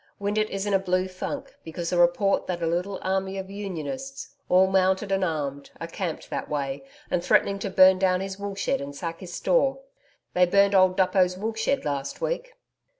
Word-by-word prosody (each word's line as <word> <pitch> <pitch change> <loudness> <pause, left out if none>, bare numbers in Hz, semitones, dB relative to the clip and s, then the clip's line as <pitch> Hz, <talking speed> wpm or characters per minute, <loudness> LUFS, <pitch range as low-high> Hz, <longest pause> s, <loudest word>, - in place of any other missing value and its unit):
Windeatt 210 +1 0
is 195 0 -3
in 205 - -1
a 195 - +4
blue 185 0 0
funk 185 0 -6
because 165 +1 -5
a - - +2
report 175 +3 +3
that 175 -2 -3
a - - +2
little 180 +4 -1
army 190 0 -1
of 190 0 -6
Unionists, 205 - -5 0.2
all 185 +1 +6
mounted 190 +1 +1
and 195 0 +1
armed, 145 -5 -3
are - - -4
camped 165 0 -5
that - - -4
way 140 -2 -3 0.3
and 175 - 0
threatening 200 +2 +2
to 200 - -3
burn 185 0 +6
down 185 -1 +2
his 195 +1 -5
wool 200 -1 -4
shed 195 - -1
and 140 0 -7
sack 165 +2 -5
his 180 -2 -9
store. - - +2 0.6
The 180 0 +4
burned 200 +2 +4
old 185 -1 +4
Duppo's 185 -1 +3
wool 220 +4 -3
shed 225 - -1
last 140 -2 -3
week.' - - -3
190 Hz, 200 wpm, -26 LUFS, 175-200 Hz, 0.6 s, all